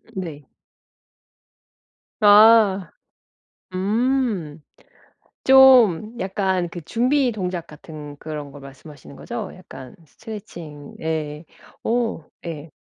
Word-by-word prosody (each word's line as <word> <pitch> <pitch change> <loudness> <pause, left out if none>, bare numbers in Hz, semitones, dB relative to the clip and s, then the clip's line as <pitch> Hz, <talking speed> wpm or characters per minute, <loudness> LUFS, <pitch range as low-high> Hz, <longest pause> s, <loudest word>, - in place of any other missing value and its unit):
네. 160 -6 -6 1.8
아. 205 -3 +6 0.8
음. 210 - -1 0.9
좀 245 -5 +6
약간 190 -2 -1
그 175 - -8
준비 250 - +1
동작 180 -5 -4
같은 150 -1 -11
그런 150 -2 -7
거 145 - -12
말씀하시는 140 +1 -13
거죠? - - -6
약간 130 -1 -12
스트레칭 170 -7 -10
예. 155 -1 -4 0.4
오. 230 -8 -1 0.2
예. 155 -1 -7
180 Hz, 150 characters per minute, -22 LUFS, 150-225 Hz, 1.8 s, 아